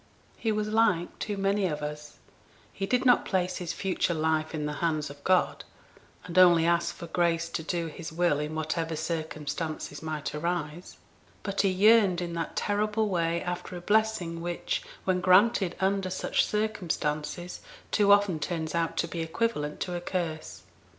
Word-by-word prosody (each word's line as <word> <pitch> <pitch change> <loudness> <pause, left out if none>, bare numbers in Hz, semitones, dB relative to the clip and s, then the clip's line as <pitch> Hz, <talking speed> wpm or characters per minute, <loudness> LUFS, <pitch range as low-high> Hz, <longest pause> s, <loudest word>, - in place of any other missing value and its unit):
He 225 - -1
was 215 0 -1
like 210 -6 +2
too 205 -1 -3
many 195 0 +1
of 150 -3 -4
us, 150 0 -6 0.6
he 195 - -3
did 250 +3 +1
not 250 - +5
place 185 -1 -1
his 175 -2 -3
future 185 -2 -1
life 160 0 0
in 150 -1 -2
the 150 - -2
hands 155 -3 0
of 145 0 -14
God, 185 -1 +2 0.6
and 180 +1 +1
only 175 -3 +7
ask 170 0 +1
for - - -8
grace 170 0 +1
to 165 - -3
do 170 +1 -2
His 160 +1 -7
will 170 -3 +2
in 150 +1 -3
whatever 160 +1 -2
circumstances 155 -1 -4
might 155 -2 -4
arise; 170 +1 -3 0.5
but 195 -1 0
he 195 - +3
yearned 200 -1 +5
in 175 -1 -4
that 165 -1 -4
terrible 210 +1 0
way 170 -2 0
after 180 0 -4
a - - -5
blessing 185 -4 +1
which, 175 - -2 0.2
when 185 -1 +1
granted 185 0 +4
under 195 0 +1
such 185 - 0
circumstances, 175 -5 -2 0.3
too 205 -2 +4
often 200 -5 +4
turns 160 0 -3
out 165 -1 -1
to 165 - +1
be 170 - -5
equivalent 160 -3 -2
to 180 - -2
a 175 - -3
curse. 170 -4 -4
175 Hz, 170 wpm, -28 LUFS, 160-195 Hz, 0.6 s, only